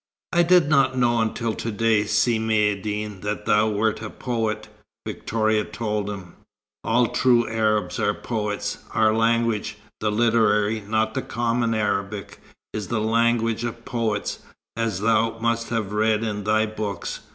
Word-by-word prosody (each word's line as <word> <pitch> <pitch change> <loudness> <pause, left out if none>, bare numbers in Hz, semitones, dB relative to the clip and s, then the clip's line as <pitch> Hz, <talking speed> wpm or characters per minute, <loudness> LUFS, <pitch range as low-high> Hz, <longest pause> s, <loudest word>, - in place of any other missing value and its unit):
"I 175 - +5
did 175 -2 +5
not 135 -3 +3
know 120 -2 +3
until 115 0 -1
to 115 - -4
day, 110 -1 +2
Si 110 +1 +2
Maïeddine, 105 -2 -1
that 105 0 -3
thou 110 0 +3
wert 110 +1 0
a 110 - -5
poet," 115 -4 -3 0.4
Victoria 110 -1 0
told 105 -2 -3
him. 95 -4 -8 0.5
"All 115 +1 +2
true 120 -2 +3
Arabs 110 -4 0
are 105 - +1
poets. 105 -3 -3 0.2
Our 110 -1 +4
language 115 -1 +1 0.2
the 105 -1 0
literary, 110 -1 +2
not 110 +2 0
the - - -1
common 115 -1 0
Arabic 100 -1 -2 0.3
is 105 -3 -4
the 115 - -1
language 115 +1 +1
of 115 0 -5
poets, 115 -4 -2 0.4
as 115 -5 -1
thou 115 +1 +2
must 115 0 -1
have 110 -3 -2
read 110 +1 +2
in 105 -2 -3
thy 110 +1 +3
books. 110 -2 -4
110 Hz, 150 wpm, -23 LUFS, 105-115 Hz, 0.5 s, I